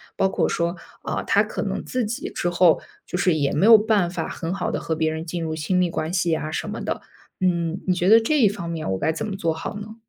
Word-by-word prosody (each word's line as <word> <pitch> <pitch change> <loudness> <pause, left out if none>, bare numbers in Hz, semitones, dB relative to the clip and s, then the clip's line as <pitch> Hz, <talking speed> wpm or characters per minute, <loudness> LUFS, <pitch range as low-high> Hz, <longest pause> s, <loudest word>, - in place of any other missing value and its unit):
包 190 - +2
括 - - +1
说， 170 +1 -1 0.3
呃， - - -2
他 - - +4
可 - - -4
能 - - -3
自 250 -2 -2
己 220 +3 -4
之 175 - -2
后 175 -2 +4 0.3
就 - - -3
是 180 -1 +3
也 145 -3 0
没 170 - +2
有 225 +1 +10
办 210 -4 +2
法 180 - -3
很 165 +1 -4
好 195 - -2
地 - - -2
和 160 - -2
别 160 0 0
人 160 +1 -5
进 170 +1 -4
入 160 -1 -3
亲 160 +4 -1
密 180 -1 +2
关 165 0 -3
系 175 -2 +1
呀 155 -1 -1
什 - - -3
么 - - -5
的， - - -3 0.4
嗯， 170 -1 0
你 185 - +4
觉 180 0 0
得 225 +1 +8
这 300 +6 +1
一 225 - +6
方 170 -4 -6
面 160 - -4
我 95 - -1
该 160 - +1
怎 190 +7 -4
么 200 - -4
做 165 -4 0
好 160 +6 -6
呢？ 210 +1 -8
175 Hz, 290 characters per minute, -23 LUFS, 160-195 Hz, 0.4 s, 有